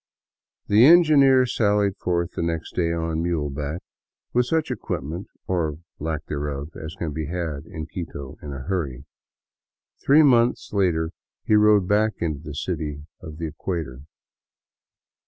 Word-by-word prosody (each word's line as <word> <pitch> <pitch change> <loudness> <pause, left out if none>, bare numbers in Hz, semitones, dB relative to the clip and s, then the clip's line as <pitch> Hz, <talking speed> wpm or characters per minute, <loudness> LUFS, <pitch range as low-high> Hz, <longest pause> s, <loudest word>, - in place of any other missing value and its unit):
'' - - -58
The 105 +3 +6
engineer 145 -6 +6
sallied 105 -4 +1
forth 85 -1 -1
next 85 -1 -2
day 85 -2 0
on 80 -1 -1
muleback, 75 -1 -2 0.5
with 125 0 +2
such 160 +1 0
equip - - -3
ment 85 +7 -6 0.2
or 80 -5 -1 0.2
lack 80 0 -3
thereof 75 0 -4
as 80 +2 -7
can 85 -5 -4
be 80 0 -3
had 80 -3 -4
in 80 -4 -6
Quito 75 -4 -7
in 75 - -7
a 70 -1 -6
hurry. 70 -8 -3 1.0
Three 150 +3 +6
months 120 -5 +3
later 85 -5 +1 0.3
he - - +2
rode 105 -3 +5
back 105 +2 +2
into 80 -4 -2
the 75 -1 -8
city 75 0 -4 0.2
of 75 -1 -9
the 85 - -4
equator. 80 -4 -4
85 Hz, 145 wpm, -24 LUFS, 75-100 Hz, 1.0 s, The